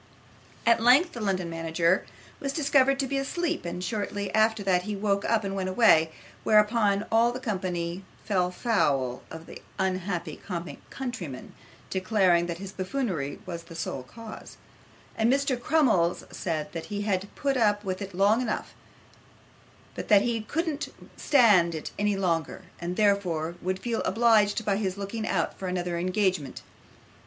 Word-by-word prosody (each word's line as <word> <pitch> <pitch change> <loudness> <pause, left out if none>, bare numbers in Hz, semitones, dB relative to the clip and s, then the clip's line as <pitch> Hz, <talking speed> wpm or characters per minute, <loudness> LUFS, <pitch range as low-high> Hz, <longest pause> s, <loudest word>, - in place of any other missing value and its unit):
At 230 0 +4
length 270 +9 +5
the 240 - -7
London 190 -4 -1
manager 165 +2 0 0.3
was 275 -1 -3
discovered 275 -3 +3
to 275 - +1
be 275 +1 -1
asleep, 330 - -2
and 175 +1 -4
shortly 205 -1 -3
after 220 -1 +3
that 185 -2 +2
he 210 +3 -4
woke 200 0 0
up 225 -2 +2
and 195 0 -3
went 190 -1 -2
away, 185 -6 +5 0.3
whereupon 210 -1 +3
all 230 +1 +4
the 250 - -5
company 185 -6 -3 0.2
fell 185 -4 +1
foul 140 - 0
of 160 0 -9
the - - -11 0.2
unhappy 185 -4 -2
comic 175 -2 -5
countryman, 205 - -6 0.4
declaring 185 -3 +2
that 170 -1 -4
his 195 +1 -7
buffoonery 185 - -3
was 170 -2 -6
the 165 -1 -11
sole 160 -5 -4
cause; 220 - -11 0.6
and 225 +2 +2
Mr. 275 -1 +2
Crummles 235 - +2
said, 160 -4 -3
that 165 - -5
he 205 -1 -3
had 195 -2 -1
put 275 -1 0
up 210 -4 +2
with 185 0 -3
it 195 -1 -6
a - - -9
long 210 +5 +4
time, 220 - -1 1.3
but - - -6
that 205 -1 +6
he 240 - 0
really 225 -2 -4
couldn't 315 +2 -2 0.3
stand 205 - +4
it 155 - -5
any 205 -1 +1
longer, 170 -5 -1 0.2
and 175 +1 -3
therefore 180 -6 +1
would 185 +1 -1
feel 230 +3 -2
obliged 225 -2 +3
by 200 -2 +1
his 195 -2 -2
looking 200 +2 -4
out 170 -4 -1
for 190 - -4
another 180 -1 -2
engagement. 185 -6 -1
200 Hz, 165 wpm, -27 LUFS, 175-225 Hz, 1.3 s, that